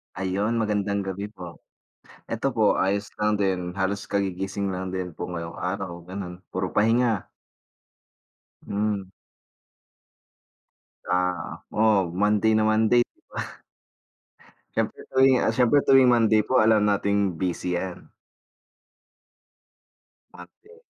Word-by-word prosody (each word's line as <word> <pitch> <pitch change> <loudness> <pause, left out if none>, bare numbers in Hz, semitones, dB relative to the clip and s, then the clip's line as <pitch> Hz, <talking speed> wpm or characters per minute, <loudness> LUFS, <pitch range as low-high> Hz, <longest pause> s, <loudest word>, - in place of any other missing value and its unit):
Ayun 100 +5 -1
magandang 100 -1 0
gabi 95 +1 -4
po, 90 -5 -10 0.7
eto 115 +3 -1
po 110 -2 +3
ayos 100 +2 0
lang 105 0 +1
din, 95 -3 -1
halos 100 +1 -2
kagigising 100 0 -2
lang 95 0 -4
din 90 -1 -3
po - - -4
ngayong 85 -2 -6
araw, 90 -2 -4
ganon 90 -1 -7 0.2
puro 95 0 -1
pahinga. 115 -1 +2 1.4
Hmm. 105 -1 -1 2.1
Ah, 90 -2 -1
o - - -6 0.3
oh, - - -8
Monday 105 +1 +3
na 110 - +3
Monday 110 +2 +4
di - - -39 0.2
ba? - - -8 1.2
Siyempre - - -2
tuwing, 130 0 +5
ah, 110 - +1
siyempre 125 +3 +3
tuwing 135 -2 +6
Monday 110 -3 +4
po 130 +5 0
alam 110 -1 +5
nating 100 -3 +1
busy 90 0 -2
yan. 95 0 -6 2.2
Parte. 420 - -16
100 Hz, 115 wpm, -25 LUFS, 95-110 Hz, 2.2 s, tuwing